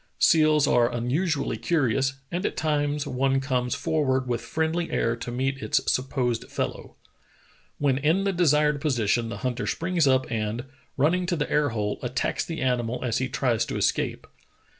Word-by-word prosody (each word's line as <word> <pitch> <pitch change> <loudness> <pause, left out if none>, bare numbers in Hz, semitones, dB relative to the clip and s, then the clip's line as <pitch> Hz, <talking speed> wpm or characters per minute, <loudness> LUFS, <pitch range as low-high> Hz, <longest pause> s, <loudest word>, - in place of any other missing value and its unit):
Seals 155 -2 +4
are 120 -3 +3
unusually 140 +6 -1
curious, 135 -4 +1 0.2
and 175 +2 -2
at - - -2
times 145 -1 0
one 135 0 +1
comes 125 -2 -1
forward 135 -5 0
with 120 -1 -1
friendly 160 +8 -1
air 115 0 0
to 115 - -6
meet 135 +3 -2
its 145 - +2
supposed 130 -3 -1
fellow. - - -4 0.8
When 140 -2 +1
in 160 +7 +2
the 195 -1 0
desired 150 -4 +3
position 120 -5 +1
the - - -5
hunter 125 -1 -2
springs 170 -3 +1
up 130 -1 +3
and, 110 +2 -2 0.3
running 175 +6 +2
to 175 - +1
the 150 - -3
air 150 -1 +2
hole, 105 -3 -2
attacks 125 +1 -1
the 165 -1 -5
animal 125 -1 -1
as 115 -3 0
he 130 0 -1
tries 125 -3 +1
to - - -3
escape. - - 0
135 Hz, 165 wpm, -25 LUFS, 125-155 Hz, 0.8 s, Seals